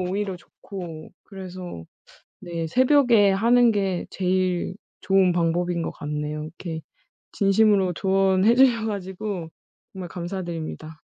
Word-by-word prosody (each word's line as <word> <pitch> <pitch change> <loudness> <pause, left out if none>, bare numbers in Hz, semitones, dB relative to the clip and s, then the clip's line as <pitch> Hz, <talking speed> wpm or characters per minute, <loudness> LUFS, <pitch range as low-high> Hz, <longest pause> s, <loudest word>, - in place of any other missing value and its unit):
오히려 190 +1 -2
좋고 175 -3 -10
그래서 185 - -8 0.6
네 170 -2 -4
새벽에 245 - +4
하는 235 +4 +4
게 195 -4 -1
제일 185 -1 -1 0.3
좋은 190 -2 +3
방법인 170 0 0
것 - - -3
같네요. 150 +1 -4
이렇게 160 0 -7 0.5
진심으로 195 -2 +3
조언해 195 +3 +3
주셔 240 -3 +4
가지고 190 -3 -4 0.5
정말 185 -2 -6
감사드립니다. 170 -3 -6
185 Hz, 265 characters per minute, -24 LUFS, 170-200 Hz, 0.6 s, 새벽에